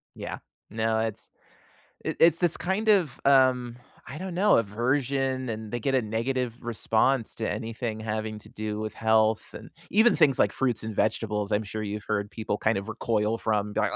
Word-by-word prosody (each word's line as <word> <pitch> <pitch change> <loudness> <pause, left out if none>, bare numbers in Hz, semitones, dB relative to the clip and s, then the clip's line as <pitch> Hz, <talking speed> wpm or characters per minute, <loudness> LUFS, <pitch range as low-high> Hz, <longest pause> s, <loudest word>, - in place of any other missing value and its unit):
Yeah. - - -6 0.3
No, 110 0 0
it's 110 -2 -4 0.7
it's 165 0 +3
this 175 -2 +3
kind 195 +5 -2
of, 180 -11 +3
um, 130 -3 +4 0.3
I 140 - -7
don't 185 +1 -5
know, 205 +4 +4
aversion 130 +4 0
and 110 -1 -5
they 120 - -2
get 135 +4 -1
a 130 - +3
negative 120 +2 -2
response 120 +1 +1
to 110 - -2
anything 115 -1 -4
having 110 0 -3
to - - -15
do 105 0 -4
with 110 0 -5
health 110 0 +2
and - - -10 0.2
even 220 +4 +5
things 145 -5 +4
like - - +4
fruits 125 -4 -1
and 110 -1 -5
vegetables, 105 -1 0
I'm 105 +1 +2
sure 110 +1 -5
you've 105 0 -5
heard 105 -1 -1
people 110 -2 -3
kind 110 -2 +1
of 100 - -8
recoil 110 -1 0
from 105 -2 -1
they're - - +1
like, - - 0
115 Hz, 185 wpm, -27 LUFS, 110-135 Hz, 0.7 s, even